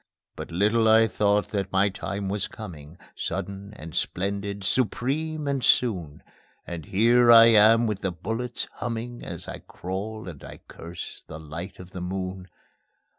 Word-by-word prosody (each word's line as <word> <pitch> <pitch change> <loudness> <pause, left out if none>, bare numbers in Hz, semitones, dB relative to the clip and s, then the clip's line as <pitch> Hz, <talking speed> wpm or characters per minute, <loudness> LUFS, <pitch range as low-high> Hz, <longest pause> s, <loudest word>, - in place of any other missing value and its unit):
But - - -7
little 105 +6 +2
I 110 +1 +7
thought 105 -1 +1
that 100 -2 -2
my 95 +1 +3
time 100 0 -4
was 100 +1 -1
coming, 80 -7 -10 0.2
Sudden 100 +1 -4
and 80 -3 -9
splendid, 100 +1 -2
supreme 140 +8 -1
and 135 -2 -1
soon; 90 -15 +1 0.4
And 85 -1 -7
here 120 +4 +5
I 115 0 +10
am 115 +1 +6
with 105 -3 -2
the 95 - -1
bullets 115 +8 -3
humming 120 +1 -4
As - - -5
I - - -6
crawl 100 +4 -6
and 80 -6 -9
I - - -9
curse 85 +1 -8
the 80 - -8
light 80 +5 -7
of 90 0 -11
the 90 - -6
moon. 95 0 -4
100 Hz, 155 wpm, -26 LUFS, 90-115 Hz, 0.4 s, I